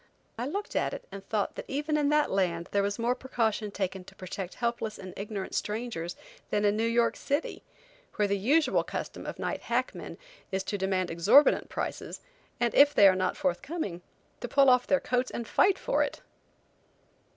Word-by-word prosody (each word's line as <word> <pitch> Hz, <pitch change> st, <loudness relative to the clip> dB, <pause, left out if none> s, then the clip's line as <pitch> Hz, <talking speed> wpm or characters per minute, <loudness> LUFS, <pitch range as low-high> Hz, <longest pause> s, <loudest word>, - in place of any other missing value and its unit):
I 240 Hz, +3 st, -3 dB
looked 405 Hz, +8 st, -4 dB
at -, -, 0 dB
it, -, -, -10 dB
and 195 Hz, 0 st, -8 dB
thought 210 Hz, -2 st, 0 dB
that -, -, -7 dB
even 295 Hz, +3 st, -1 dB
in 295 Hz, -1 st, +2 dB
that 300 Hz, 0 st, +2 dB
land 175 Hz, -3 st, 0 dB
there 200 Hz, -, +2 dB
was 200 Hz, 0 st, -1 dB
more 235 Hz, +2 st, +1 dB
precaution 230 Hz, -5 st, -1 dB
taken 190 Hz, -2 st, -3 dB
to -, -, -14 dB
protect 185 Hz, 0 st, -6 dB
helpless 235 Hz, -3 st, -2 dB
and 185 Hz, -2 st, -9 dB
ignorant 200 Hz, -1 st, -5 dB
strangers 210 Hz, -6 st, -3 dB, 0.3 s
than 210 Hz, 0 st, +1 dB
in 205 Hz, 0 st, +3 dB
New 225 Hz, +2 st, +1 dB
York 235 Hz, 0 st, +2 dB
city, 285 Hz, +3 st, -2 dB, 0.5 s
where 210 Hz, -, +2 dB
the 200 Hz, -, +1 dB
usual 280 Hz, +11 st, +2 dB
custom -, -, -6 dB
of -, -, -5 dB
night -, -, -3 dB
hack -, -, -1 dB
men -, -, -8 dB, 0.3 s
is 190 Hz, 0 st, -1 dB
to 205 Hz, -, -3 dB
demand 185 Hz, -2 st, 0 dB
exorbitant 195 Hz, -, +5 dB
prices, -, -, -4 dB, 0.4 s
and 240 Hz, -1 st, +1 dB
if 290 Hz, +1 st, +6 dB
they 200 Hz, -, +8 dB
are 190 Hz, -, +5 dB
not 185 Hz, 0 st, -1 dB
forthcoming, 185 Hz, -, -2 dB, 0.4 s
to 245 Hz, -, -4 dB
pull 275 Hz, +2 st, +5 dB
off 250 Hz, 0 st, +3 dB
their 280 Hz, -, +3 dB
coats 250 Hz, 0 st, 0 dB
and 235 Hz, -, -5 dB
fight 390 Hz, -1 st, +3 dB
for -, -, 0 dB
it. -, -, -2 dB
215 Hz, 190 wpm, -29 LUFS, 190-260 Hz, 0.5 s, they